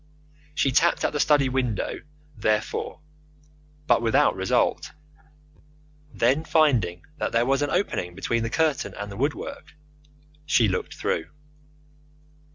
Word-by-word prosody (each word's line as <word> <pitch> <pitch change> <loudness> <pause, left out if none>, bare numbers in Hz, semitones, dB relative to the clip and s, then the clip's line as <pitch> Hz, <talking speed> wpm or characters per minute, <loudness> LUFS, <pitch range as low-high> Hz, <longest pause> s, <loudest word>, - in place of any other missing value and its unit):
She 135 - +2
tapped 165 +6 +3
at - - 0
the 150 - -2
study 145 -2 +4
window, 125 -5 -2 0.4
therefore, 110 +7 -1 0.8
but - - +3
without 115 -1 +3
result. - - 0 1.2
Then, 130 +7 +1
finding 140 - +2 0.2
that - - -2
there 115 +1 +3
was 135 +2 +1
an 145 - 0
opening 90 - -1
between 115 +4 -1
the 115 - -2
curtain 155 +1 0
and 105 0 -6
the 100 - -8
woodwork, 155 - -4 0.7
she 125 -6 +3
looked 95 - -3
through. 80 - -2
130 Hz, 125 wpm, -25 LUFS, 110-150 Hz, 1.2 s, study